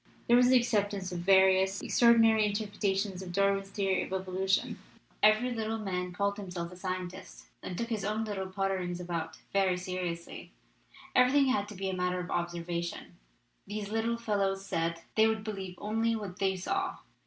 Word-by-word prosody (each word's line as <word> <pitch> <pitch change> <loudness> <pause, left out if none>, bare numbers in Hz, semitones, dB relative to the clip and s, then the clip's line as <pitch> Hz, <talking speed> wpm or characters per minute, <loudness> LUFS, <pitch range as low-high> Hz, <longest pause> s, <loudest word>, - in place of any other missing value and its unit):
There 240 - +6
was 250 0 +6
the 255 - +7
acceptance 205 -5 0
of 175 - -3
various 190 +1 +4
extraordinary 225 -2 +5
interpretations 205 -2 -1
of 185 -2 -7
Darwin's 195 +1 +1
theory 195 -2 0
of - - -6
evolution! 190 0 -1 0.4
Every 215 +4 +4
little 225 -1 -2
man 180 -4 -3
called 200 +2 -1
himself 180 -4 -5
a - - -10
scientist, 185 -1 -6 0.2
and 180 - -6
took 230 +3 -3
his 220 -4 -2
own 215 +2 -1
little 195 -3 -3
potterings 190 -2 -2
about 170 -2 -4 0.2
very 190 -2 +2
seriously. 180 -2 -5 0.6
Every 250 0 +5
thing 280 -1 +4
had 205 -6 +1
to 210 - -9
be 190 +1 -3
a 190 - -2
matter 180 0 -1
of 180 - -5
observation, 170 0 -3 0.5
these 205 0 -4
little 225 +1 0
fellows 195 -4 -1
said; 165 -2 -2
they 220 0 +5
would 220 -1 -1
believe 195 -4 -5
only 225 +3 0
what 200 -4 -6
they 190 -1 +1
saw. 380 - -2
195 Hz, 170 wpm, -30 LUFS, 180-215 Hz, 0.6 s, the